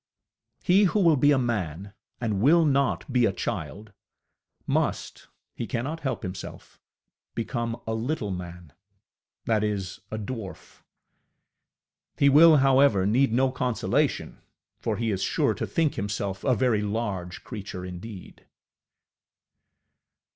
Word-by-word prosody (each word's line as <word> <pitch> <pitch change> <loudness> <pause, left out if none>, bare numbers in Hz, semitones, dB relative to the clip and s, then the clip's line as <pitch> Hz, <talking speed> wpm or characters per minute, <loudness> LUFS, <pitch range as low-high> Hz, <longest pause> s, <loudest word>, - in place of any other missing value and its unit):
He 195 +3 +5
who 200 +3 +1
will 165 -5 +5
be 145 +1 +3
a 140 - +4
man, 100 -6 -2 0.3
and 110 -5 -1
will 165 +6 +5
not 140 -2 0
be 120 -2 +4
a - - 0
child, 105 +2 -5 0.7
must - - -2 0.3
he 115 - -5
cannot 130 +11 -3
help 135 -5 -3
himself 95 -1 -8 0.6
become 115 0 -3
a 110 - -2
little 115 -1 -2
man, 90 -3 -8 0.7
that 110 -2 +1
is, 100 -3 -3
a 110 - -4
dwarf. 110 -2 -8 1.4
He 140 - +5
will, 155 +3 +8
however, 135 -7 +4
need 120 +5 +3
no 130 +3 +2
consolation, 125 -2 -1 0.4
for - - -2
he 115 -1 -1
is 95 -2 -2
sure - - +1
to - - -4
think 160 -3 +1
himself 100 -1 -3
a 130 -3 +3
very 120 -4 +2
large 100 -4 -3
creature 100 -5 -7
indeed. 90 +2 -10
115 Hz, 125 wpm, -26 LUFS, 100-135 Hz, 1.4 s, will